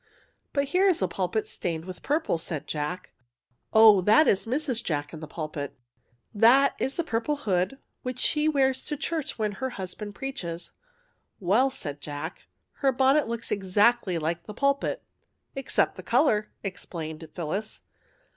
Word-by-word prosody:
'' - - -35
" - - -46
But 280 -1 0
here 370 +6 +4
is 355 -3 +3
a - - +2
pulpit 190 +3 -1
stained 165 -2 -4
with 185 -1 -8
purple," 295 - 0
said 155 -3 -4
Jack. 150 +5 -4 0.3
" 120 -1 -47
Oh, 220 -3 +8
that 220 - +5
is 200 +3 +2
Mrs. 255 -2 0
Jack 145 -2 -2
in 160 - -7
the 155 - -7
pulpit. 150 -2 -5 0.6
That 245 +6 +6
is 265 - -1
the 340 - 0
purple 235 +1 -1
hood 195 -1 0 0.2
which 255 -1 -4
she 300 +3 +2
wears 265 -3 +2
to 295 - -3
church 320 0 -3
when 215 -2 0
her 260 +7 -3
husband 200 +2 -6
preaches." 175 -11 -5 0.3
" - - -40 0.3
Well," 210 +9 +3
said 145 - -6
Jack, 145 -1 -6
" - - -51
her 275 -2 +4
bonnet 265 +3 +3
looks 230 0 -4
ex 190 -1 -3
actly 210 -4 +4
like 165 +2 -2
the 210 - -7
pulpit." 280 +2 0 0.3
" - - -46
Except 270 -1 0
the - - -6
colour," 230 -4 +2
explained 160 -5 -6
Phyllis. 190 +6 -3
215 Hz, 175 wpm, -27 LUFS, 170-270 Hz, 0.6 s, Oh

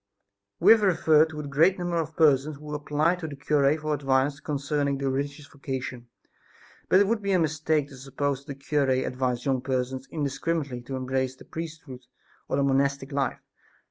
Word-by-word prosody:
We - - +7
have 225 -1 +7
referred 160 -5 +4
to 150 -1 -6
the - - -6
great 160 +7 +3
number 175 -1 -2
of 160 -1 -3
persons 150 -1 +3
who 150 +1 -8
applied 150 +4 0
to 160 - -4
the 145 - -7
cure 145 +1 +2
for 155 0 -2
advice 135 0 +1
concerning 145 -1 -1
the 135 -1 -1
religious 140 +2 -3
vocation, 130 -4 -6 0.8
but 185 - +6
it 200 - +5
would 220 +2 0
be 200 -1 0
a - - +4
mistake 155 -2 +1
to 135 - -12
suppose 135 +1 -2
that 140 -2 -7
the 140 - -24
cure 145 -3 +1
advised 130 -1 -1
young 135 -2 +1
persons 130 0 -2
indiscriminately 145 -2 -2
to 130 +2 -6
embrace 130 0 -1
the - - -15
priesthood 155 -6 -8 0.4
or - - 0
the 140 - +2
monastic 140 0 +1
life. 140 -3 -1
140 Hz, 185 wpm, -26 LUFS, 135-155 Hz, 0.8 s, We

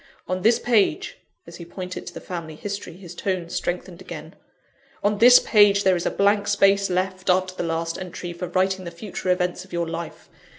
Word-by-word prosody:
On 185 0 -2
this 230 +3 +4
page 240 - +1
" - - -51
(as - - -11
he 170 - -8
pointed 180 +2 -7
to - - -7
the - - -5
family 165 -3 -7
history, 200 0 -6
his 180 -1 -11
tones 175 -1 -3
strengthened 180 0 -3
again) 160 -2 -9 0.7
"on 205 0 +1
this 245 +2 +9
page 205 -2 +4
there 190 -1 +4
is 175 - -1
a - - +3
blank 205 +1 +2
space 195 0 +3
left, 185 +1 -2
after 185 0 +2
the - - -5
last 165 0 -2
entry, 175 -1 -6
for 180 +1 -5
writing 190 +1 0
the 170 - -5
future 180 +2 -6
events 180 0 0
of 190 - -19
your 170 -1 -1
life. 165 0 -6
185 Hz, 205 wpm, -23 LUFS, 170-200 Hz, 0.7 s, this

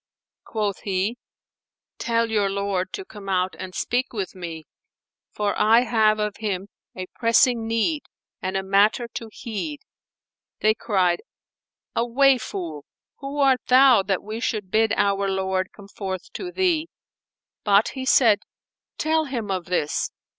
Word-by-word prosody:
Quoth 210 -3 -2
he, 200 +4 -1 0.8
"Tell 230 -1 0
your 205 -2 +2
lord 195 -2 -1
to 390 -2 -5
come 205 - -10
out 185 0 0
and 185 -1 -7
speak 245 +1 -1
with 200 -4 -3
me, 165 -4 -7 0.6
for 205 -1 -1
I 225 +3 +5
have 220 -3 +3
of 210 -1 -2
him 200 -2 -3 0.3
a 185 - -4
pressing 230 0 +3
need 230 +7 0 0.4
and 190 +1 -2
a 190 - -2
matter 205 +5 +3
to 230 - -6
heed." 255 +7 -5 0.8
They 215 0 +4
cried, 185 -6 +1 0.7
"Away, 255 +3 +4
fool! 165 -9 -6 0.3
who 275 +1 -6
art 270 -3 +4
thou 255 -3 +7
that 190 -1 -1
we 215 +2 -5
should 210 -6 -2
bid 220 0 +3
our 200 -1 +2
lord 190 -1 -1
come 200 - -14
forth 190 -2 -6
to 360 -2 -5
thee?" 345 -4 +1 0.7
But 205 0 +4
he 260 -1 -6
said, 225 -5 +5 0.6
"Tell 315 0 +1
him 235 -7 -4
of 185 -2 -2
this." 175 -4 -1
215 Hz, 145 wpm, -24 LUFS, 190-240 Hz, 0.8 s, thou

